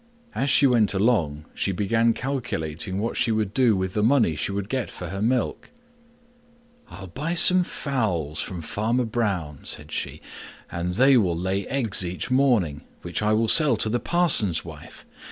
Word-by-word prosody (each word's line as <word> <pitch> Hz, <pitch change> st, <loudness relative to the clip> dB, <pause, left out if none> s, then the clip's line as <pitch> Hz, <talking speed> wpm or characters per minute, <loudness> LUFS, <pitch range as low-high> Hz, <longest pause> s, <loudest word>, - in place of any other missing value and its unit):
As 140 Hz, -, -1 dB
she 140 Hz, -, +5 dB
went 115 Hz, -6 st, +3 dB
along 85 Hz, -9 st, 0 dB
she 100 Hz, -, -1 dB
began 115 Hz, +4 st, +1 dB
calculating 95 Hz, -, -4 dB
what 110 Hz, +4 st, -3 dB
she 115 Hz, -, +2 dB
would 110 Hz, -2 st, -1 dB
do 120 Hz, -3 st, +3 dB
with 95 Hz, -1 st, -3 dB
the 105 Hz, -, 0 dB
money 115 Hz, -, +3 dB
she 75 Hz, -, -2 dB
would 100 Hz, 0 st, -4 dB
get 130 Hz, 0 st, -3 dB
for 90 Hz, -, -8 dB
the 95 Hz, +3 st, -5 dB
milk. 120 Hz, +2 st, -1 dB, 1.2 s
"I'll 95 Hz, -, -10 dB
buy 150 Hz, -, -4 dB
some 180 Hz, +1 st, +6 dB
fowls 100 Hz, -, -2 dB
from 90 Hz, -3 st, -6 dB
Farmer 115 Hz, +9 st, -1 dB
Brown," 100 Hz, -, -2 dB
said 75 Hz, 0 st, -4 dB
she, -, -, -4 dB, 0.5 s
"and 90 Hz, +1 st, -3 dB
they 135 Hz, +4 st, +5 dB
will 90 Hz, -7 st, +1 dB
lay 95 Hz, +2 st, -2 dB
eggs 115 Hz, -8 st, -1 dB
each 90 Hz, +6 st, -5 dB
morning, 120 Hz, -, +2 dB, 0.2 s
which 85 Hz, +3 st, -4 dB
I 105 Hz, 0 st, +1 dB
will 110 Hz, +1 st, +1 dB
sell 150 Hz, +5 st, +6 dB
to 110 Hz, -, 0 dB
the 120 Hz, +2 st, 0 dB
parson's 130 Hz, -, +1 dB
wife. -, -, -12 dB
105 Hz, 170 wpm, -24 LUFS, 90-125 Hz, 1.2 s, some